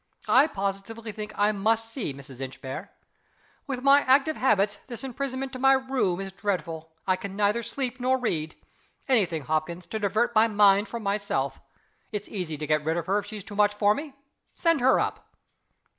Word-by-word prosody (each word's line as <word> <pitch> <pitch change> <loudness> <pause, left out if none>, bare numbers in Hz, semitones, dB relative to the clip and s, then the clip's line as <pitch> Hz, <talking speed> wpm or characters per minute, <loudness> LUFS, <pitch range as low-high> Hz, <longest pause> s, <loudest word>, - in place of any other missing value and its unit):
I 270 +4 +6
positively 200 0 -4
think 210 0 -6
I 205 +1 +4
must 225 +2 0
see 235 - -3
Mrs. 135 -1 -11
Inchbare. 135 +5 -6 0.8
With 260 -2 -4
my 280 +1 +7
active 275 +4 +3
habits, 205 -5 +2
this 235 -1 -8
imprisonment 270 +1 -4
to 255 - -6
my 270 +1 +6
room 260 -9 0
is 195 0 -5
dreadful. 180 -4 -3 0.2
I 185 - +3
can 195 +1 -7
neither 210 +3 +2
sleep 250 +2 -4
nor 255 +1 +2
read. 160 -11 -2 0.5
Any 235 -8 +4
thing, 160 -4 -4
Hopkins, 160 +4 -2
to 220 - -4
divert 215 +4 +1
my 220 0 +5
mind 205 -1 +4
from 235 -2 -6
myself: 200 -10 -1 0.5
It's 210 -1 -4
easy 180 -7 -4
to 150 - -4
get 150 0 +1
rid 160 +2 0
of 170 - -2
her 195 +3 +2
if 205 - -8
she 215 0 -7
is 200 - -8
too 205 - -10
much 205 0 +3
for 205 0 +4
me. 285 +2 -7 0.4
Send 330 -3 +2
her 260 +2 +5
up." - - -4
210 Hz, 190 wpm, -27 LUFS, 185-250 Hz, 0.8 s, my